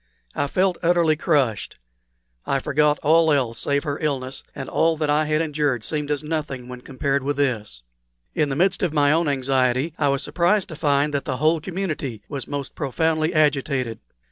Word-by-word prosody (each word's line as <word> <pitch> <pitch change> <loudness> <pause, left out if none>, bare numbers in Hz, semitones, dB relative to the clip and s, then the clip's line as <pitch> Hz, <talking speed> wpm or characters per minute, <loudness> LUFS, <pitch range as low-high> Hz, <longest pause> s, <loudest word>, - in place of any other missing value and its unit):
I 145 - -1
felt 185 +4 +1
utterly 170 -2 +3
crushed. 140 - 0 0.7
I 140 - +2
forgot 150 +2 +2
all 160 +1 +4
else 125 -5 0
save 140 0 0
her 145 -1 -3
illness, 135 -3 -3
and 135 -2 -6
all 165 0 +2
that 150 -1 0
I 150 +1 +2
had 155 +1 +1
endured 145 -6 -1
seemed 150 +3 -3
as 150 0 -1
nothing 150 -5 -4
when 125 -1 -8
compared 135 +2 -1
with 140 +1 -2
this. 110 - -2 0.5
In 150 -2 +1
the 135 - -2
midst 185 +7 +1
of 175 -5 0
my 145 -2 +3
own 165 +1 +2
anxiety 130 +1 +1
I 145 - +2
was 140 0 0
surprised 175 +7 +1
to 160 - -7
find 145 -1 +1
that 140 - -1
the 130 -3 -2
whole 155 +3 +2
community 155 - -4
was 140 -3 -5
most 140 -1 -5
profoundly 155 +3 0
agitated. 140 -6 +1
145 Hz, 185 wpm, -23 LUFS, 135-155 Hz, 0.7 s, all